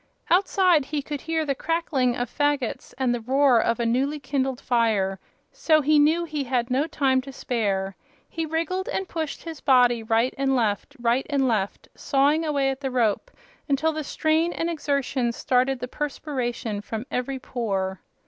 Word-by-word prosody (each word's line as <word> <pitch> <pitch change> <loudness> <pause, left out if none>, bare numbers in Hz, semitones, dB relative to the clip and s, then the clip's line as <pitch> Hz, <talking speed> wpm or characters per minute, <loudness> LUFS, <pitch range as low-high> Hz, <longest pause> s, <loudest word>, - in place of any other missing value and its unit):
Outside 365 -4 +4
he 290 0 -3
could 290 -1 -5
hear 325 -1 -1
the 280 - 0
crackling 275 -5 0
of 245 0 -2
fagots 290 -1 -1
and 255 -2 +1
the 240 - -3
roar 260 0 +4
of 230 +1 0
a 235 - 0
newly 270 +6 0
kindled 270 -2 -2
fire, 215 -7 +1 0.3
so 310 -1 +3
he 300 +1 +4
knew 315 +4 +3
he 305 -3 -3
had 245 -1 -1
no 275 +5 +1
time 270 -5 +1
to 275 +1 -9
spare. 200 -7 -2 0.3
He 325 -1 -4
wriggled 335 +4 -2
and 385 - -2
pushed 320 -4 -4
his 325 -3 -8
body 245 -4 +4
right 225 +3 +1
and 270 -1 +2
left, 215 -5 -1
right 240 +2 +1
and 275 -2 +2
left, 205 -5 -1
sawing 285 +3 +2
away 280 -3 +1
at 265 +1 -7
the 270 - -2
rope, 245 - 0 0.4
until 285 +3 +2
the 310 0 -3
strain 315 +4 +1
and 335 +1 -2
exertion 280 -5 -1
started 255 +2 +1
the 250 - -4
perspiration 250 -7 -3
from 220 +2 -5
every 260 +2 -2
pore. 195 -7 -3
270 Hz, 175 wpm, -25 LUFS, 240-300 Hz, 0.4 s, Outside